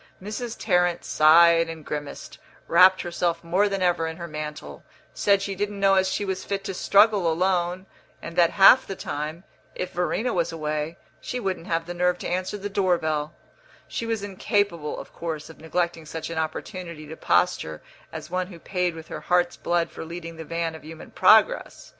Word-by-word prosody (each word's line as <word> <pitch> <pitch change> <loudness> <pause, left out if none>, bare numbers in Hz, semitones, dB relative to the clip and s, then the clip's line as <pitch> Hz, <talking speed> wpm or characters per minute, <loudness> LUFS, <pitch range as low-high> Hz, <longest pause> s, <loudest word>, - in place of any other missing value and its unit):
Mrs. 220 +4 -5
Tarrant 180 -1 +1
sighed 165 +2 +5
and 160 -2 -8
grimaced, 145 -2 -6 0.3
wrapped 185 +2 +6
herself 175 -1 -2
more 185 +5 +2
than 195 -1 -2
ever 175 -2 +1
in 160 0 -6
her 170 - -6
mantle, 150 - -7 0.3
said 200 -1 +2
she 200 - -3
didn't 205 +1 -3
know 195 0 +4
as 190 0 +3
she 195 +2 -2
was 190 -1 -3
fit 200 -1 -3
to 195 - -4
struggle 200 -2 +4
alone, 180 +1 0 0.3
and 165 - -8
that, 175 -2 +5
half 200 +6 +6
the 195 - -5
time, 155 +1 -5 0.3
if 185 - -4
Verena 180 +8 -1
was 170 -2 0
away, 155 0 -3 0.2
she 250 - -4
wouldn't 190 -6 -3
have 165 0 -1
the 175 - -6
nerve 180 0 +1
to - - -6
answer 185 +3 -2
the 205 0 -5
door 190 -3 +1
bell; 155 -1 -2 0.5
she 230 - -4
was 225 -3 -2
incapable, 195 -5 -1
of - - -11
course, 160 -2 -5
of - - -18
neglecting 165 0 -2
such 160 +2 -6
an 165 - -5
opportunity 165 0 -5
to 155 +2 -9
posture 80 - 0 0.3
as 155 -1 -7
one 185 0 -1
who 180 -3 -11
paid 180 0 -2
with 160 0 -10
her - - -6
heart's 175 -1 +1
blood 170 -1 -1
for - - -8
leading 165 0 -7
the 160 - -7
van 165 0 -3
of 160 - -11
human 160 +1 -11
progress. - - +3
175 Hz, 190 wpm, -25 LUFS, 160-190 Hz, 0.5 s, wrapped